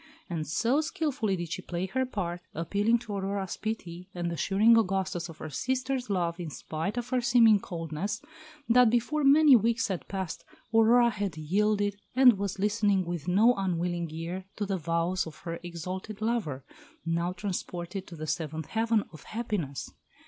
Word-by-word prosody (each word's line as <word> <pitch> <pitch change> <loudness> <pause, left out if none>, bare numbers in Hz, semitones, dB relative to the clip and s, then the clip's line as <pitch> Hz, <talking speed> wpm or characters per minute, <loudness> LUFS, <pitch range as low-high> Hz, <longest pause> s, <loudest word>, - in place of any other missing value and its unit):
And 155 -3 -2
so 240 - +2
skilfully 290 -10 -1
did 175 -2 -5
she - - -3
play 175 +1 -3
her 260 +7 -1
part, 175 -7 -3
appealing 205 +8 +2
to 215 - -6
Aurora's 195 -1 -2
pity, 180 -5 -5
and 175 -1 -2
assuring 200 +7 +4
Augustus 190 -5 0
of 165 - -10
her 155 - -7
sister's 260 - -1
love 175 -3 0
in 170 -3 -4
spite 160 - -4
of 240 0 -3
her 255 -1 +1
seeming 235 -3 +6
coldness, 170 +4 -4 0.5
that 245 0 +6
before 245 +6 +1
many 285 0 +7
weeks 230 0 +2
had 185 -3 -3
passed 190 -4 -4 0.3
Aurora 235 +2 +5
had 195 -6 -3
yielded 205 +5 +1
and 250 -6 +7
was 200 -1 -2
listening 205 -1 +2
with 170 -2 -4
no 210 +7 +5
unwilling 175 -4 -1
ear 170 +4 -5
to 205 - -2
the 195 -2 -2
vows 170 +3 0
of 160 - -10
her 170 -1 -5
exalted 185 +4 -6
lover, 215 - -1 0.4
now 170 +1 0
transported 185 0 -4
to 170 - -9
the 155 -1 -5
seventh 160 -1 -3
heaven 225 -1 +1
of 155 - -11
happiness. 210 - -3
195 Hz, 165 wpm, -29 LUFS, 170-225 Hz, 0.5 s, many